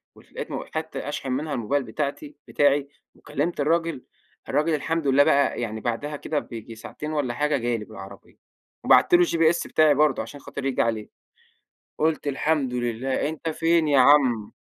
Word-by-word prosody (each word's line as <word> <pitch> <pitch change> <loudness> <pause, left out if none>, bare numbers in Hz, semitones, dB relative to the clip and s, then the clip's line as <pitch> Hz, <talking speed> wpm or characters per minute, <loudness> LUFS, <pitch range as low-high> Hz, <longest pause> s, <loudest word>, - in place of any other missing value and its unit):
ولقيت - - -9
م - - -4
حتّة 160 -2 -4
أشحن 135 -3 -4
منها 150 +4 -2
الموبايل 130 +4 -1
بتاعتي 155 - -4
بتاعي، 145 -1 +2 0.3
وكلِمت 150 +3 -3
الراجل 165 -2 0 0.5
الراجل 155 +2 +1
الحمد 160 +1 -2
لله 135 +1 +5
بقى 140 -3 +2
يعني 110 -1 -4
بعدها 135 +5 -3
كده 150 +1 -2
بييجي 115 -1 -9
ساعتين 150 +7 -7
والّا 140 -5 -1
حاجة 150 +2 0
جالي 120 -3 -2
بالعربية 100 -2 -12 0.5
وبَعت - - +5
له 350 0 +7
الGPS 165 - +1
بتاعي 155 -2 +4
برضه 150 -2 +2
عشان 140 +6 -9
خاطر 140 0 -7
ييجي 135 -2 +1
عليه. 110 -2 -2 0.9
قلت: 155 -1 0
"الحمد 140 -2 0
لله 125 +3 -1
أنت 160 +1 -5
فين 165 0 +2
يا 140 -2 +4
عم؟" 125 -6 +4
145 Hz, 160 wpm, -24 LUFS, 125-155 Hz, 0.9 s, له